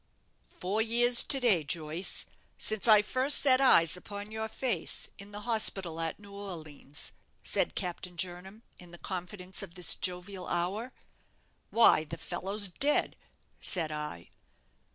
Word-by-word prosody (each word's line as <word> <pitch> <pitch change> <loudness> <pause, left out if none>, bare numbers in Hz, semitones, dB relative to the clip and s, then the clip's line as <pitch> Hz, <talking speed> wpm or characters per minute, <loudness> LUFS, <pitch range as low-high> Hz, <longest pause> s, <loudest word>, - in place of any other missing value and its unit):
"Four 200 +4 -2
years 240 +2 +5
to 270 - +5
day, 215 -11 +2
Joyce, 155 +4 -1 0.3
since 215 +1 +1
I 215 -2 +7
first 260 +6 +3
set 260 -2 +5
eyes 170 - +6
upon 205 +3 -7
your 220 0 -3
face 220 -6 -1
in 200 +1 -10
the 205 0 -6
hospital 195 -7 0
at 165 -1 -2
New 200 -1 -14
Orleans," 160 -7 -7 0.3
said - - 0
Captain 180 -1 -4
Jernam, 185 +5 -5 0.2
in 180 - -13
the 175 - -11
confidence 185 +1 -6
of 185 -4 -9
this 180 -2 +3
jovial 180 +1 -3
hour. 195 +8 -2 0.8
"'Why, 225 -9 +5
the 165 +2 -7
fellow's 195 +5 -1
dead,' 280 +11 +1 0.5
said 165 -4 0
I. 150 - -6
190 Hz, 140 wpm, -30 LUFS, 175-220 Hz, 0.8 s, I